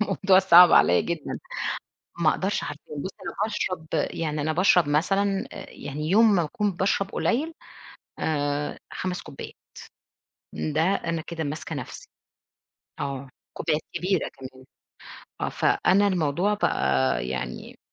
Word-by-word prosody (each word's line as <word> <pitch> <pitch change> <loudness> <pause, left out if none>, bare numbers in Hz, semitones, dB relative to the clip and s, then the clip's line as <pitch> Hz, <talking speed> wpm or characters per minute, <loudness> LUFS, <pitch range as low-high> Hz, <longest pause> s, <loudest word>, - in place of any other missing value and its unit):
الموضوع 190 -2 +3
صعب 180 -1 +8
عليّ 90 0 +5
جدًا 170 -3 -4 0.8
ما - - +4
أقدرش - - -1
حرفيًا، 150 - -8
بُصي 185 +7 -5
أنا - - -5
باشرب 185 -6 -3 0.2
يعني 155 -2 -2
أنا 155 +2 0
باشرب 180 -2 +4
مثلًا 195 +6 +1
آآ - - -8
يعني 150 +3 -6
يوم 215 +1 +5
ما 175 - +2
أكون 205 +6 -1
باشرب 195 +2 0
قليل 305 +8 0 0.7
آآ 145 -1 -1
5 180 -1 -3
كوبايات، - - -9 1.0
ده 155 +1 -1
أنا 165 -2 0
كده 165 -2 -4
ماسكة 155 +2 -5
نفسي، 140 - -8 0.9
آه 140 -1 -4 0.2
كوبايات 155 -1 -1
كبيرة 185 -1 0
كمان 130 -1 -12 0.8
آه، - - 0
فأنا 200 +2 +2
الموضوع 180 +3 +1
بقى 65 - +1
يعني 65 0 -5
165 Hz, 125 wpm, -25 LUFS, 145-190 Hz, 1.0 s, صعب